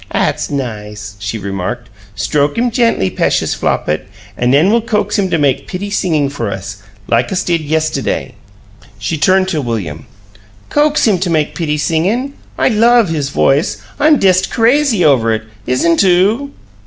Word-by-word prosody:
"'At's -, -, -1 dB
nice!" 105 Hz, -6 st, -5 dB
she 105 Hz, +3 st, -4 dB
remarked. 100 Hz, +4 st, -4 dB, 0.3 s
"Stroke 140 Hz, +7 st, 0 dB
him 240 Hz, +1 st, +1 dB
gently, 230 Hz, -, +1 dB
p'eshus -, -, 0 dB
Flopit, 75 Hz, +4 st, -1 dB, 0.3 s
an' 120 Hz, -, 0 dB
nen 150 Hz, +9 st, +4 dB
we'll 235 Hz, +1 st, +3 dB
coax 210 Hz, -2 st, -1 dB
him 190 Hz, -2 st, 0 dB
to 165 Hz, -, +1 dB
make 140 Hz, -4 st, 0 dB
pitty 200 Hz, +2 st, -5 dB
singin' 160 Hz, -8 st, +1 dB
for 130 Hz, -6 st, -4 dB
us, 100 Hz, +1 st, -7 dB, 0.3 s
like 120 Hz, +1 st, +1 dB
us 190 Hz, 0 st, 0 dB
did 170 Hz, -2 st, 0 dB
yestiday." 155 Hz, +1 st, -1 dB, 0.7 s
She 110 Hz, +10 st, -3 dB
turned 185 Hz, +3 st, +3 dB
to 155 Hz, -5 st, -1 dB
William. 95 Hz, -, -4 dB, 0.6 s
"COAX 295 Hz, -2 st, +2 dB
him 200 Hz, -5 st, +2 dB
to 180 Hz, 0 st, -1 dB
make 155 Hz, -3 st, 0 dB
pitty 150 Hz, -3 st, -2 dB
singin'? 185 Hz, -, 0 dB, 0.2 s
I -, -, +2 dB
LOVE 230 Hz, -2 st, +4 dB
his 150 Hz, -4 st, -2 dB
voice 140 Hz, +4 st, +1 dB, 0.2 s
I'm 300 Hz, +1 st, +5 dB
dest 190 Hz, -2 st, +2 dB
CRAZY 235 Hz, -3 st, +2 dB
over 120 Hz, -6 st, +3 dB
it. 110 Hz, -, -5 dB, 0.2 s
Isn't 165 Hz, +8 st, +2 dB
oo?" 200 Hz, +9 st, +2 dB
160 Hz, 160 wpm, -15 LUFS, -, 0.7 s, I'm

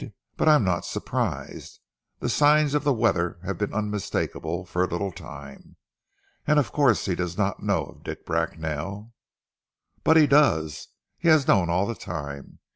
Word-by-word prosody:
But -, -, 0 dB
I 155 Hz, -, +8 dB
am 150 Hz, -, +3 dB
not 90 Hz, -3 st, 0 dB
surprised. -, -, -4 dB, 0.4 s
The -, -, -1 dB
signs 150 Hz, 0 st, +4 dB
of 150 Hz, -1 st, +1 dB
the 145 Hz, -, +2 dB
weather 90 Hz, -8 st, +1 dB
have 95 Hz, -1 st, -4 dB
been 105 Hz, -, -1 dB
unmistakable 100 Hz, -4 st, -3 dB
for 90 Hz, +1 st, -1 dB
a -, -, +1 dB
little 95 Hz, +3 st, -3 dB
time. 70 Hz, -4 st, -11 dB, 0.7 s
And 150 Hz, 0 st, +4 dB
of 145 Hz, -, +2 dB
course 135 Hz, -7 st, +3 dB
he 95 Hz, -, 0 dB
does 90 Hz, 0 st, -3 dB
not 100 Hz, -1 st, -1 dB
know 100 Hz, -6 st, +1 dB
of -, -, -16 dB
Dick -, -, -7 dB
Bracknell!" 85 Hz, +9 st, -3 dB, 0.9 s
"But 160 Hz, -, +5 dB
he 155 Hz, -, +7 dB
does! 120 Hz, -, +2 dB, 0.3 s
He 170 Hz, -, -1 dB
has 155 Hz, -4 st, +5 dB
known 90 Hz, -3 st, +4 dB
all 90 Hz, +3 st, +2 dB
the 115 Hz, -, -3 dB
time. 70 Hz, -8 st, -7 dB
100 Hz, 170 wpm, -25 LUFS, 85-140 Hz, 0.9 s, I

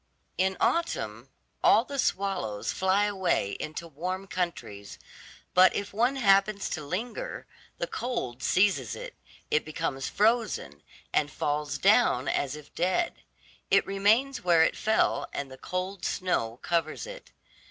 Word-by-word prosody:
In 190 Hz, 0 st, +1 dB
autumn, 335 Hz, 0 st, -1 dB, 0.3 s
all 220 Hz, -, +6 dB
the 280 Hz, 0 st, -5 dB
swallows 190 Hz, -, -1 dB
fly 190 Hz, +2 st, +2 dB
away 190 Hz, -, 0 dB
into 155 Hz, +2 st, -5 dB
warm 180 Hz, +5 st, -4 dB
countries, 165 Hz, -, -4 dB, 0.6 s
but 185 Hz, +1 st, +6 dB
if 200 Hz, 0 st, -3 dB
one 240 Hz, +6 st, +2 dB
happens 200 Hz, -4 st, +3 dB
to 155 Hz, -, -3 dB
linger, 235 Hz, -, -4 dB, 0.3 s
the -, -, -1 dB
cold 230 Hz, -, -4 dB
seizes 195 Hz, +1 st, +2 dB
it, -, -, -8 dB, 0.4 s
it 150 Hz, -, +3 dB
becomes 155 Hz, -4 st, -3 dB
frozen, 210 Hz, -, +1 dB, 0.3 s
and 145 Hz, -, +2 dB
falls 150 Hz, 0 st, -2 dB
down 195 Hz, -, +4 dB
as 140 Hz, 0 st, 0 dB
if 150 Hz, -1 st, -13 dB
dead; 185 Hz, -, 0 dB, 0.5 s
it -, -, +4 dB
remains 220 Hz, +8 st, +2 dB
where 170 Hz, -2 st, +5 dB
it -, -, +1 dB
fell, 220 Hz, 0 st, +1 dB
and 140 Hz, -2 st, -4 dB
the 130 Hz, -, -10 dB
cold 185 Hz, +1 st, -4 dB
snow 120 Hz, -14 st, -1 dB
covers 165 Hz, -, -1 dB
it. -, -, -10 dB
185 Hz, 135 wpm, -28 LUFS, 150-215 Hz, 0.6 s, all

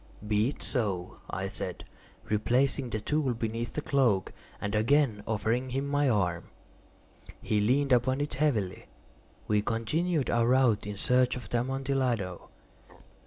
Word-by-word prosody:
"Be 105 Hz, +1 st, +2 dB
it 145 Hz, -, -5 dB
so," 100 Hz, -8 st, -1 dB
I -, -, -3 dB
said, -, -, -5 dB, 0.4 s
replacing 125 Hz, +5 st, +1 dB
the 110 Hz, -, -2 dB
tool 135 Hz, +2 st, 0 dB
beneath 115 Hz, +1 st, -3 dB
the 150 Hz, -, -3 dB
cloak, 120 Hz, -9 st, +2 dB, 0.3 s
and 100 Hz, -, -3 dB
again 115 Hz, 0 st, +2 dB
offering 115 Hz, +4 st, 0 dB
him 135 Hz, +3 st, -2 dB
my 145 Hz, -1 st, +2 dB
arm. 90 Hz, -7 st, 0 dB, 0.9 s
He 105 Hz, -1 st, 0 dB
leaned 135 Hz, +6 st, +2 dB
upon 130 Hz, +2 st, +2 dB
it 145 Hz, -3 st, -2 dB
heavily. 125 Hz, -10 st, -1 dB, 0.6 s
We 105 Hz, -1 st, +2 dB
continued 140 Hz, +9 st, 0 dB
our 115 Hz, 0 st, +2 dB
route 125 Hz, -5 st, +3 dB
in 105 Hz, -1 st, -5 dB
search 125 Hz, +4 st, +2 dB
of 125 Hz, -, -8 dB
the 120 Hz, -, +1 dB
Amontillado. 130 Hz, -7 st, -1 dB
120 Hz, 140 wpm, -29 LUFS, 105-135 Hz, 0.9 s, route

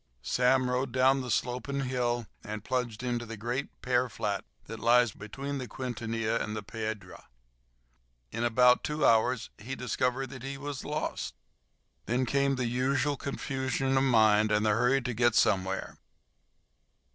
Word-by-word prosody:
Sam 125 Hz, +1 st, +3 dB
rode 125 Hz, +1 st, -1 dB
down 130 Hz, +2 st, +3 dB
the 125 Hz, -, -6 dB
sloping 125 Hz, +4 st, -1 dB
hill 120 Hz, -2 st, -1 dB, 0.2 s
and 105 Hz, -1 st, -6 dB
plunged 125 Hz, -2 st, -2 dB
into 120 Hz, -1 st, -1 dB
the 115 Hz, 0 st, -7 dB
great 120 Hz, +6 st, -4 dB
pear 125 Hz, 0 st, +2 dB
flat 100 Hz, -3 st, -2 dB, 0.2 s
that 115 Hz, -, -7 dB
lies 120 Hz, 0 st, +4 dB
between 135 Hz, +8 st, -6 dB
the 125 Hz, -, -5 dB
Quintanilla 115 Hz, -2 st, -2 dB
and 105 Hz, -, -3 dB
the 105 Hz, -, -4 dB
Piedra. 110 Hz, -3 st, -6 dB, 1.0 s
In 115 Hz, +2 st, -3 dB
about 125 Hz, +1 st, +5 dB
two 150 Hz, 0 st, 0 dB
hours 115 Hz, +1 st, +3 dB
he 125 Hz, +5 st, -5 dB
discovered 125 Hz, +2 st, -1 dB
that 130 Hz, -2 st, -8 dB
he 135 Hz, +2 st, -5 dB
was 145 Hz, -1 st, -5 dB
lost. 150 Hz, +1 st, -3 dB, 0.7 s
Then 125 Hz, +3 st, +1 dB
came 140 Hz, +2 st, +2 dB
the 125 Hz, -1 st, -1 dB
usual 135 Hz, +4 st, +1 dB
confusion 135 Hz, -1 st, -2 dB
of 135 Hz, -, +4 dB
mind 110 Hz, -4 st, +4 dB
and 105 Hz, +1 st, +2 dB
the 105 Hz, -, +4 dB
hurry 125 Hz, +5 st, +2 dB
to 125 Hz, 0 st, -2 dB
get 120 Hz, 0 st, +3 dB
somewhere. 95 Hz, +1 st, +1 dB
125 Hz, 155 wpm, -29 LUFS, 115-130 Hz, 1.0 s, about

